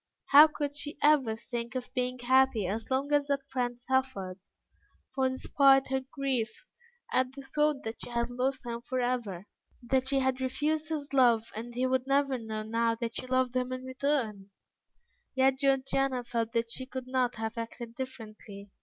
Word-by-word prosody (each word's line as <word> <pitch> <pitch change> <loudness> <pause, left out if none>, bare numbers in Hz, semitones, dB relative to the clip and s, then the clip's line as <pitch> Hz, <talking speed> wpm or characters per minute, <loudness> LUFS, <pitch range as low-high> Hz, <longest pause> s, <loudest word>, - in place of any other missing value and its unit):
How 295 +3 +10
could 290 -2 -4
she 290 0 -5
ever 285 -7 +4
think 235 +2 -6
of 250 0 -5
being 250 -1 -1
happy 255 -3 +3
as 215 +5 -3
long 270 +2 0
as 290 -1 +3
that 280 -1 -1
friend 245 -2 -1
suffered? 245 -8 -1 0.7
For 265 -1 +2
despite 270 +1 +4
her 265 0 +1
grief 260 - -2 0.5
at 255 0 +2
the 275 0 -9
thought 295 +1 0
that 225 +1 -6
she - - -4
had 235 0 -1
lost 260 +2 -1
him 235 -1 -4
for 255 +1 -3
ever, 235 -7 -2 0.4
that 260 +2 +1
she 275 0 +1
had 260 -1 +1
refused 300 +4 -1
his 295 -3 -4
love 235 -4 +4
and 235 +2 -7
he 255 +1 +1
would 260 0 0
never 275 -1 +2
know 220 -1 -4
now 230 +1 +1
that 230 0 -4
she 255 - -5
loved 255 -1 +1
him 255 0 0
in 255 0 -4
return, 260 -7 -1 0.9
yet 265 0 +3
Georgiana 270 -2 +1
felt 230 -1 -2
that 230 0 0
she 260 +2 -3
could 260 -1 -6
not 255 -1 0
have 220 0 -4
acted 230 0 -6
differently. 215 -5 -8
255 Hz, 180 wpm, -30 LUFS, 235-270 Hz, 0.9 s, How